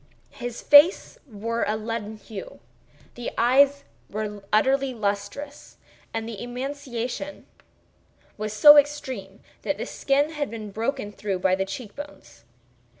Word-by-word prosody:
His 240 -1 -7
face 295 +6 +6
wore 230 +3 -2
a 215 - 0
leaden 220 -1 -5
hue; 200 - -9 0.5
the 240 - -5
eyes 275 +4 +4 0.3
were 210 -1 -5
utterly 265 +4 +2
lustreless; 205 +7 -4 0.3
and 225 0 -4
the 225 -3 -7
emaciation 255 +1 -5 0.9
was 215 0 -4
so 295 +8 +9
extreme 260 -9 0 0.2
that - - -2
the - - -4
skin 285 +3 0
had 300 -5 -3
been 215 -2 -7
broken 225 +1 -3
through 200 -1 -3
by 185 0 +2
the 190 +1 +1
cheek 205 +2 -8
bones. 290 - -11
230 Hz, 130 wpm, -25 LUFS, 210-275 Hz, 0.9 s, so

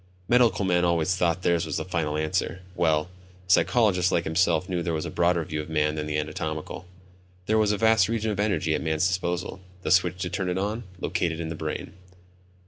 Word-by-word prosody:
Medical 120 -5 +3
men 90 -1 +2
always 85 +1 +2
thought 90 0 0
theirs 85 -1 +1
was - - -2
the - - -3
final 80 -4 -1
answer; 80 +3 -2
well, 80 -1 +2 0.4
psychologists 95 -2 +3
like 85 - +1
himself 85 +1 +1
knew 90 -2 -2
there 85 -1 -1
was 80 - -3
a - - -5
broader 85 -1 +2
view 75 -1 -3
of 75 - -10
man 75 -1 +1
than 75 -1 -4
the 75 0 -1
anatomical. 80 +3 -4 0.6
There 110 +2 +2
was 105 -1 +3
a 105 - 0
vast 110 -2 +4
region 110 -1 -1
of 100 - -4
energy 95 -6 +1
at - - -1
man's 80 +1 0
disposal; 90 0 -2 0.2
the 80 - -1
switch 90 -1 +3
to 90 - -3
turn 95 0 -2
it 90 - -1
on, 105 +4 -2
located 85 -2 -1
in 80 -1 -4
the 80 - -4
brain. - - -5
90 Hz, 210 wpm, -26 LUFS, 80-95 Hz, 0.6 s, vast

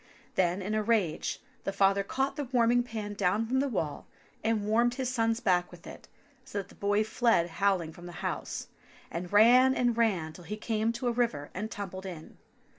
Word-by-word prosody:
Then 185 +1 +1
in 205 +3 -2
a 215 - +1
rage, 210 -7 0 0.2
the - - -1
father 195 0 +3
caught 270 +7 -1
the 290 -2 -3
warming 245 -1 +3
pan 220 -4 -5
down 205 +2 +1
from 260 +3 +1
the 280 - +1
wall 160 - -3 0.4
and 220 -2 +1
warmed 235 +3 +2
his 260 -1 -2
son's 225 -2 +1
back 180 -6 +2
with - - -14
it - - -11 0.4
so 260 -5 -7
that 195 -1 -4
the - - -15
boy 205 +1 +1
fled 220 -5 +2
howling 185 -5 +2
from 175 +1 -11
the - - -8
house, - - -4 0.4
and 175 +2 -5
ran 250 +5 +6
and 245 -2 +2
ran 190 -9 +1
till 175 - -13
he 210 - -5
came 220 0 0
to 240 +1 -3
a - - +3
river 230 -12 -1
and 210 +4 -4
tumbled 190 -2 -6
in. 165 -4 -9
215 Hz, 200 wpm, -30 LUFS, 190-235 Hz, 0.4 s, ran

